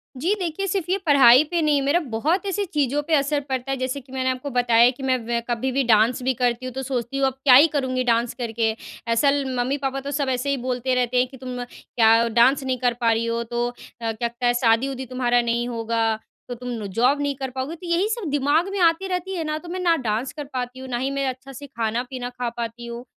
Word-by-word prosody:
जी, 335 +11 0
देखिए 360 +3 -2
सिर्फ 365 -2 -1
ये 380 - +2
पढ़ाई 270 -2 +7
पे 340 -1 +1
नहीं, 295 -2 +2
मेरा 285 +6 +2
बहुत 310 - -1
ऐसी 400 +1 -1
चीज़ों 290 -3 0
पे 325 - 0
असर 285 +1 +1
पड़ता 260 +1 -2
है, 270 - -1
जैसे 255 +2 -2
कि 260 +1 -20
मैंने 260 0 0
आपको 255 +2 -3
बताया 240 -1 +4
कि 265 +1 -11
मैं 260 -1 +2
वै 235 0 0
कभी 240 +3 -1
भी 270 +1 +1
डांस 230 +2 +3
भी 260 0 +1
करती 245 0 -1
हूँ, 255 - -5
तो 265 - -4
सोचती 255 0 -3
हूँ 270 -1 +3
अब 265 - -2
क्या 255 -3 +8
ही 295 +5 +8
करूँगी 255 -2 0
डांस 235 0 +1
करके, 225 -2 -1 0.4
असल 280 +4 +3 0.2
मम्मी-पापा 270 +1 -1
तो 280 +1 -5
सब 285 -2 -1
ऐसे 255 +2 -1
ही 280 - +1
बोलते 255 +1 0
रहते 250 0 0
हैं 250 +1 +3
कि, 265 0 -13
"तुम 250 -1 -5
क्या 230 -1 +2
डांस 240 +5 +4
नहीं 260 -1 -1
कर 245 -1 +1
पा 230 -1 +3
रही 225 +1 0
हो, 230 0 -1
तो 240 +1 -2 0.3
अ, 225 -1 -1
क्या 235 +2 -2 0.2
क 240 - +4
शादी-उदी 260 +3 +1
तुम्हारा 245 -1 +1
नहीं 235 0 -1
होगा, 230 -1 -1 0.4
तो - - -3
तुम 250 +1 -7
नु 225 -4 -4
जॉब 255 +5 +3
नहीं 285 -1 -1
कर 265 -1 -4
पाओगी।" 265 +5 -3
तो 345 +1 -10
यही 345 +4 +1
सब 435 -8 -3
दिमाग 290 +5 +2
में 395 - -3
आती 340 +2 +3
रहती 370 +1 -3
है 330 - -2
ना, 305 0 -2
तो 340 +2 -10
मैं 370 - -4
ना 345 -2 +3
डांस 225 +5 -1
कर 295 -1 -6
पाती 250 0 -4
हूँ, 260 - -8
ना 240 - -1
ही 265 +3 -2
मैं 275 0 -1
अच्छा 260 +1 -8
से 285 +3 -9
खाना-पीना 245 +1 -3
खा 245 -1 -4
पाती 235 0 -5
हूँ। 235 +1 -7
255 Hz, 250 wpm, -23 LUFS, 240-285 Hz, 0.4 s, क्या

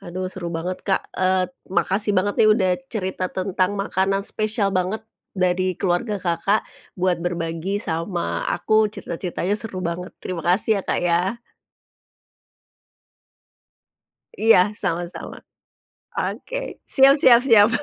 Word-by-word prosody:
Aduh 185 +1 -4
seru 175 -2 -5
banget 175 +3 -3
Kak. 190 - +1
Eee, 185 0 +2 0.2
makasih 200 +2 +1
banget 200 +2 +1
nih 215 - +6
udah 190 -4 +2 0.2
cerita 190 -4 -2
tentang 185 +1 -1
makanan 195 0 0
spesial 215 -1 -1
banget 185 +4 -1 0.3
dari 185 0 +1
keluarga 195 +3 0
Kakak, 185 +3 0 0.3
buat 180 -2 +1
berbagi 170 +2 -2
sama 170 -2 -2
aku, 215 0 +2
cerita-ceritanya 180 -2 -4
seru 205 -3 -3
banget, 170 +2 -4
terimakasih 185 +4 0
ya - - -12
Kak - - +1
ya. 175 +5 +1 3.0
Iya, 210 - +4
sama-sama. 175 -3 -4 0.8
Oke. - - -4
Siap, 270 0 +6
siap, 240 -4 +7
siap. 225 -5 +6
185 Hz, 115 wpm, -22 LUFS, 180-210 Hz, 3.0 s, siap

